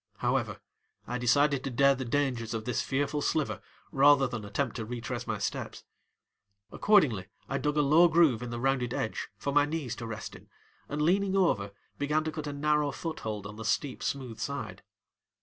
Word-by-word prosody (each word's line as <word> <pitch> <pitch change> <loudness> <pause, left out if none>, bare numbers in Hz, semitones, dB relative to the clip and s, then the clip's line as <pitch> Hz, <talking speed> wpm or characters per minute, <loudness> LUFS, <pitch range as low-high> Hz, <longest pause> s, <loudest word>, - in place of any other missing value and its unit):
However, - - -1 0.5
I 125 - -3
decided 140 +3 +3
to 135 - -2
dare 140 +2 +4
the 130 -1 -4
dangers 120 -3 -1
of 110 -1 -4
the 125 - -2
fearful 145 +4 -1
sliver 155 0 0 0.3
rather 140 0 +6
than 120 -3 -5
to 105 - -8
attempt 120 +4 -2
to 115 - -3
retrace 120 0 -5
my - - -1
steps. - - -4 0.9
Accordingly 140 - +3 0.2
I 135 - -2
dug 150 0 -1
a 150 - +4
low 155 +5 +6
groove 160 -8 +4
in 125 - -5
the 120 0 -4
rounded 130 -1 0
edge 110 - -3
for 140 +7 -3
my 145 0 +5
knees 150 -6 -3
to 115 - -6
rest 115 0 -6
in - - -15 0.4
and, 150 +1 -1
leaning 195 +4 +2
over, 100 - +2 0.3
began 150 +2 +1
to 155 - -3
cut 155 -1 -5
a - - -2
narrow 150 0 +1
foothold 110 - -5
on 105 +1 -8
the 110 - -6
steep, 130 +4 -1
smooth 130 -5 -3
side. 110 -9 -4
140 Hz, 190 wpm, -29 LUFS, 115-150 Hz, 0.9 s, rather